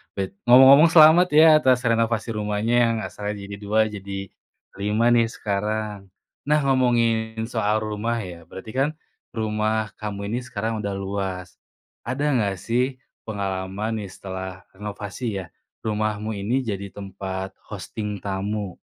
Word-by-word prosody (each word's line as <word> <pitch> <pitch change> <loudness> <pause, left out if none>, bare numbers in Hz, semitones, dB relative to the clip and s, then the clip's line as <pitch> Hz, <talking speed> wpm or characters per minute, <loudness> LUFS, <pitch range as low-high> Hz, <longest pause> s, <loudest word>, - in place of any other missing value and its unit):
Bet 95 -1 -3
ngomong-ngomong 135 +6 +8
selamat 165 +2 +8
ya 155 +1 +8
atas 130 -4 +4
renovasi 115 -1 +1
rumahnya, 105 +2 0
yang 115 -1 +2
asalnya 105 0 -5
jadi 100 - -6
2 105 +2 -1
jadi 100 -2 -6 0.5
5 105 +3 0
nih 115 -1 +3
sekarang. 105 -1 -3 0.3
Nah, 150 +1 +3
ngomongin 115 -4 +2
soal 110 -2 0
rumah 110 +2 -2
ya, 90 -5 -8
berarti 95 +6 -10
kan, 135 +3 +2 0.4
rumah 110 0 -1
kamu 100 -1 -5
ini 115 +4 -1
sekarang 110 -2 -3
udah 100 - -2
luas. 95 -2 -4 0.5
Ada 130 +4 -3
enggak 100 -4 +1
sih, 125 +5 -1 0.2
pengalaman 100 +1 -3
nih, 100 - -7
setelah 95 0 -7
renovasi 105 +3 -7 0.2
ya, 95 - -6 0.4
rumahmu 110 0 -1
ini 105 +6 0
jadi 100 -2 -4
tempat 95 -1 -6 0.2
hosting 105 -2 -5
tamu? 100 0 -3
105 Hz, 135 wpm, -23 LUFS, 100-115 Hz, 0.5 s, ngomong-ngomong